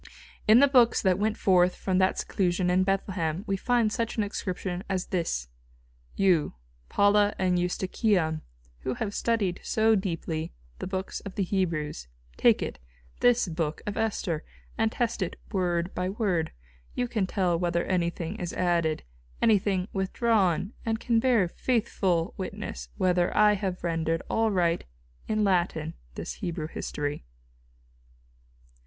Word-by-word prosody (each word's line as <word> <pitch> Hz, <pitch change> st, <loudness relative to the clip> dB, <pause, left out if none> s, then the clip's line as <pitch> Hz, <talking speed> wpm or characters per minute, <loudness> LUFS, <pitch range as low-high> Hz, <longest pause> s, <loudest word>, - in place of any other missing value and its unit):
In 215 Hz, +2 st, +8 dB
the 280 Hz, +3 st, +7 dB
books 250 Hz, -4 st, +5 dB
that 190 Hz, -1 st, +3 dB
went 215 Hz, +1 st, 0 dB
forth 180 Hz, -1 st, +4 dB
from 185 Hz, -1 st, 0 dB
that 185 Hz, 0 st, +2 dB
seclusion 180 Hz, -1 st, 0 dB
in 185 Hz, +1 st, +3 dB
Bethlehem 185 Hz, -3 st, -1 dB
we 195 Hz, -, 0 dB
find 235 Hz, +1 st, +2 dB
such 230 Hz, 0 st, -2 dB
an 215 Hz, -, +2 dB
inscription 185 Hz, -2 st, -4 dB
as 185 Hz, -2 st, -1 dB
this: 165 Hz, -, -1 dB, 0.7 s
You, 180 Hz, -, +2 dB, 0.3 s
Paula, 205 Hz, 0 st, +4 dB
and 180 Hz, -1 st, +2 dB
Eustochium, 180 Hz, -2 st, 0 dB, 0.4 s
who 130 Hz, -, -3 dB
have 205 Hz, -2 st, -3 dB
studied 205 Hz, -7 st, 0 dB
so 220 Hz, 0 st, +2 dB
deeply 165 Hz, -5 st, -2 dB, 0.3 s
the -, -, -4 dB
books 190 Hz, 0 st, -3 dB
of 200 Hz, -, -9 dB
the 200 Hz, -, +1 dB
Hebrews, 165 Hz, -, -2 dB, 0.3 s
take -, -, +4 dB
it, -, -, -5 dB, 0.4 s
this 245 Hz, -3 st, +4 dB
book 160 Hz, -2 st, -3 dB
of 210 Hz, -1 st, -3 dB
Esther, 185 Hz, -7 st, -1 dB, 0.3 s
and 225 Hz, -1 st, +1 dB
test 235 Hz, -2 st, -1 dB
it 180 Hz, -, -2 dB, 0.2 s
word 175 Hz, -2 st, 0 dB
by 180 Hz, 0 st, -1 dB
word; 190 Hz, -6 st, 0 dB, 0.4 s
you 245 Hz, -, 0 dB
can 215 Hz, -6 st, -1 dB
tell 180 Hz, -3 st, +1 dB
whether 170 Hz, -1 st, 0 dB
anything 175 Hz, +1 st, -1 dB
is 175 Hz, -4 st, -4 dB
added, 170 Hz, -3 st, +1 dB, 0.4 s
anything 195 Hz, -3 st, +2 dB
withdrawn: 195 Hz, -1 st, +1 dB
and 225 Hz, -1 st, -1 dB
can 235 Hz, -1 st, +2 dB
bear 230 Hz, -6 st, +3 dB
faithful 190 Hz, -5 st, 0 dB
witness 60 Hz, -, -5 dB
whether 180 Hz, -1 st, +2 dB
I 210 Hz, 0 st, +6 dB
have 190 Hz, -3 st, -3 dB
rendered 165 Hz, -1 st, 0 dB
aright 185 Hz, -7 st, +1 dB, 0.4 s
in 215 Hz, -1 st, +1 dB
Latin 175 Hz, -4 st, +1 dB, 0.2 s
this -, -, -5 dB
Hebrew 170 Hz, -3 st, -3 dB
history. 145 Hz, -2 st, -4 dB
185 Hz, 140 wpm, -27 LUFS, 170-210 Hz, 0.7 s, In